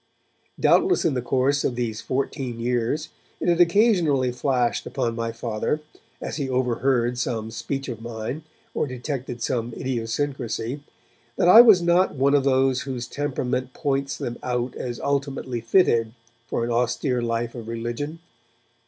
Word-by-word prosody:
Doubtless 370 - +3
in 160 - +2
the 125 - -1
course 135 +3 +1
of 125 - 0
these 115 -2 -3
fourteen 130 -1 -3
years 125 +6 -1 0.3
it - - -3
had 175 0 +4
occasionally 170 - +3
flashed 125 -1 0
upon 120 -4 -2
my 115 0 -2
Father, 115 +5 -2 0.4
as - - -5
he 140 -3 -2
overheard 125 -1 +1
some 110 -2 -2
speech 135 +5 -4
of 115 -4 -6
mine, 115 +5 -5 0.3
or - - 0
detected 130 -2 -5
some 120 -1 -1
idiosyncrasy, 125 0 -3 0.5
that - - +2
I 220 +6 +11
was 215 -7 +6
not 175 0 +3
one 140 +1 +2
of 145 -2 +4
those 130 -1 +2
whose 130 -3 -4
temperament 130 -3 -2
points 140 -3 -1
them 120 - -5
out 125 0 -2
as 120 -2 -5
ultimately 140 -3 -2
fitted 115 -5 +3 0.3
for 115 - -1
an 120 - -2
austere 125 +2 0
life 115 0 -2
of 115 -3 -8
religion. 120 +7 -4
130 Hz, 150 wpm, -24 LUFS, 120-140 Hz, 0.5 s, I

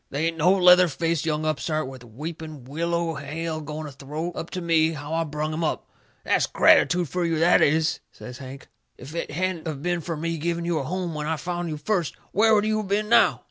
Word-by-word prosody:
They 145 +4 -1
ain't 165 0 0
no 170 +3 +4
leather 180 -1 +7
faced 165 +1 -1
young 155 0 0
upstart 155 0 -1
with 130 -2 -10
weepin' 150 +4 -8
willow 170 +4 -1
hair 155 +3 -4
going 155 +1 -6
to 150 - -7
throw 150 +5 -5
up 165 - -6
to 185 - -4
me 165 -1 +2
how 145 0 -6
I 165 0 +1
brung 150 +1 -3
him 165 +2 -2
up. 155 - -2 0.4
That's - - +2
gratitood 175 -1 +4
fur 180 +4 -2
you, 165 -1 0
that 170 +3 +5
is!" 155 +2 +2
says 125 0 -10
Hank. 135 0 -10 0.3
"If 135 +5 -10
it 170 - -3
hadn't 175 +1 -2
of 150 -3 -5
been 175 -1 0
fur 165 +2 -4
me 165 +1 -3
giving 170 +2 -2
you 170 -2 0
a - - -3
home 180 +3 -3
when 150 0 -4
I 160 0 0
found 175 +1 -3
you 155 - -4
first, 170 +1 -1 0.2
where 220 +2 +4
would 210 0 +2
you 215 0 +1
of 210 - -4
been 210 +2 0
now?" 235 - +5
160 Hz, 230 wpm, -25 LUFS, 150-175 Hz, 0.4 s, leather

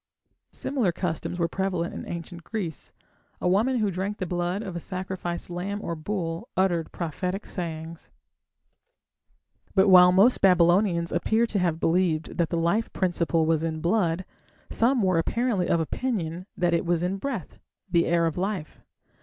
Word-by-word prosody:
Similar 250 -10 0
customs 175 0 -3
were 170 -1 +1
prevalent 185 -2 -2
in - - -7
Ancient 170 0 -7
Greece. 180 -6 -5 0.5
A - - -1
woman 220 +8 +2
who 210 -3 +1
drank 195 +3 -3
the 185 - -3
blood 175 +3 -2
of 190 -5 -6
a - - -2
sacrificed 185 -1 -5
lamb 195 +4 -3
or 170 - -4
bull 165 - -4
uttered 175 -4 +1
prophetic 180 +4 -3
sayings. 165 -2 -6 1.7
But 195 +1 +5
while 180 -1 +8
most 200 +7 +4
Babylonians 175 -1 +4
appear 225 +2 +2
to 220 -3 -1
have 170 -3 0
believed 165 -1 0
that 165 -2 +2
the 170 - -1
life 170 +7 +1
principle 170 -3 +1
was 160 -1 +2
in 160 -1 -2
blood, 175 0 +1 0.5
some 240 0 +2
were 185 -3 +3
apparently 225 0 0
of 170 - +3
opinion 180 -2 -2
that 175 -1 +1
it 170 - +2
was 175 -1 0
in 185 +2 -1
breath 225 - -5 0.3
the 170 -3 +2
air 170 0 +3
of 165 +1 -1
life. 190 -4 -3
180 Hz, 160 wpm, -26 LUFS, 170-195 Hz, 1.7 s, while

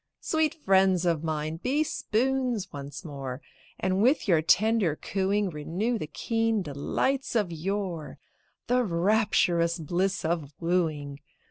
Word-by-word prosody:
Sweet 315 -1 0
friends 190 - +3
of 165 -3 +1
mine, 155 0 -2
be 270 - +1
spoons 250 -5 -1
once 140 +4 -7
more, 135 -4 -6 0.4
And 185 +1 +1
with 255 +4 +3
your 170 -5 +4
tender 205 -1 +3
cooing 195 +3 -1
Renew 185 +10 -2
the 155 - -4
keen 225 +6 0
delights 240 - -1
of 205 -6 +1
yore 175 -1 -3 0.5
The 250 0 +2
rapturous 175 -3 +2
bliss 180 +4 -1
of 160 -4 -2
wooing. 155 -5 -1
185 Hz, 125 wpm, -27 LUFS, 160-220 Hz, 0.5 s, your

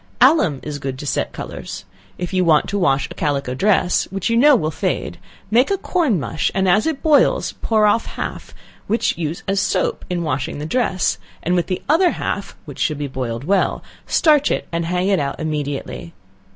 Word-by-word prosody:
Alum 160 - +4
is 145 -1 -5
good 135 -1 -4
to 145 - -7
set - - -1
colors. 95 +1 -7 0.3
If 180 +1 -5
you 185 -1 +2
want 160 -3 +4
to 200 - -1
wash 140 -6 +2
a - - -9
calico 140 -3 -1
dress, 185 +3 +2
which 195 +4 -3
you - - +2
know 285 +4 +6
will 155 -9 0
fade, 185 +4 -3 0.3
make 245 +4 +4
a 395 - +1
corn 315 - +1
mush, 155 +2 -1
and 190 0 +2
as 200 - +3
it 315 -4 -2
boils, 315 +11 +3
pour 215 -2 +2
off 220 +2 +2
half, - - -6 0.4
which 225 +3 +1
use 165 -1 -4
as 195 0 +1
soap - - 0
in 175 -1 -1
washing 135 -4 -2
the 150 - -5
dress, 190 -1 0 0.2
and 175 - 0
with 175 -1 +1
the 185 - -3
other 335 +5 +4
half, 200 -10 -4
(which 145 -4 -10
should 155 - 0
be 145 - -3
boiled 125 -3 -4
well,) 195 +5 +1 0.2
starch 300 -3 +4
it, - - -2
and 170 0 -1
hang 180 +2 0
it 195 -3 +2
out 140 -1 -3
immediately. 150 +1 -4
180 Hz, 200 wpm, -20 LUFS, 145-215 Hz, 0.4 s, know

